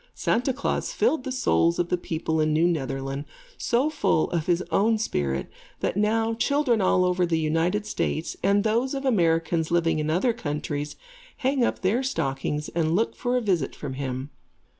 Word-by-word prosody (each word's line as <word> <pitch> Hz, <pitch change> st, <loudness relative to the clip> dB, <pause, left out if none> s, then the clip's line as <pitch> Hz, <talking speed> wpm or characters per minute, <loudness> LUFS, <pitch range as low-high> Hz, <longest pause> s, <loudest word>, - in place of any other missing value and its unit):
Santa 250 Hz, +3 st, +1 dB
Klaas 280 Hz, -, -2 dB
filled 320 Hz, -, +1 dB
the 265 Hz, -, -3 dB
souls 170 Hz, -9 st, +2 dB
of 175 Hz, 0 st, 0 dB
the -, -, +2 dB
people 160 Hz, -2 st, -2 dB
in 155 Hz, 0 st, +2 dB
New 160 Hz, +3 st, +3 dB
Netherland 135 Hz, -3 st, -2 dB, 0.3 s
so 260 Hz, +6 st, +1 dB
full 225 Hz, -, +1 dB
of 165 Hz, -3 st, -1 dB
his 175 Hz, 0 st, +2 dB
own 220 Hz, +2 st, +3 dB
spirit, 70 Hz, -, -1 dB, 0.3 s
that -, -, -1 dB
now 225 Hz, +2 st, +1 dB
children 250 Hz, -1 st, +1 dB
all 185 Hz, -1 st, +3 dB
over 180 Hz, 0 st, +1 dB
the 170 Hz, -2 st, +1 dB
United 165 Hz, +6 st, 0 dB
States, 170 Hz, -6 st, -2 dB
and 200 Hz, +1 st, +3 dB
those 235 Hz, +5 st, +1 dB
of 275 Hz, 0 st, -4 dB
Americans 165 Hz, -7 st, +2 dB
living 165 Hz, -2 st, +2 dB
in 155 Hz, 0 st, -1 dB
other 190 Hz, +9 st, +2 dB
countries, 150 Hz, -3 st, -4 dB, 0.4 s
hang 265 Hz, -1 st, +1 dB
up -, -, 0 dB
their 200 Hz, +7 st, +2 dB
stockings 150 Hz, -, -2 dB
and 165 Hz, -1 st, 0 dB
look 225 Hz, +4 st, +1 dB
for 245 Hz, 0 st, 0 dB
a -, -, 0 dB
visit 180 Hz, -, 0 dB
from 130 Hz, -, -6 dB
him. 130 Hz, +1 st, -4 dB
175 Hz, 180 wpm, -25 LUFS, 155-230 Hz, 0.4 s, New